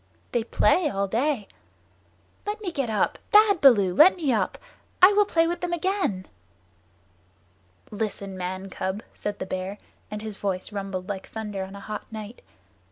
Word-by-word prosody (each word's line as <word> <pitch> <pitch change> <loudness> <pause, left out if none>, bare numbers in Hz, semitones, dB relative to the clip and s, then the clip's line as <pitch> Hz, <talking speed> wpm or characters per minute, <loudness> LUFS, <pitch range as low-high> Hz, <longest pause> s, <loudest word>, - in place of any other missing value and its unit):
They 240 - +1
play 305 +7 +3
all 200 -4 -1
day. 235 +1 0 1.0
Let 420 +1 -2
me 395 -5 -4
get 275 -7 -2
up! 215 - 0
Bad 415 -4 +6
Baloo, 205 -9 +6
let 325 - +7
me 300 -8 0
up! 215 - 0 0.4
I 370 +3 +8
will 415 0 +4
play 330 -3 +3
with 345 +1 -2
them 350 -1 -2
again." 345 - -1 1.7
"Listen, 200 -2 -4
man 185 +1 -5
cub," 190 +3 -3
said 205 0 -4
the - - -4
Bear, 185 +2 -4 0.3
and 210 0 -6
his 215 -2 -6
voice 190 0 -3
rumbled 195 -2 -4
like 195 -2 -5
thunder 210 -3 -5
on 190 +1 -9
a - - -8
hot 210 +2 -7
night. 220 +1 -8
215 Hz, 165 wpm, -25 LUFS, 195-320 Hz, 1.7 s, I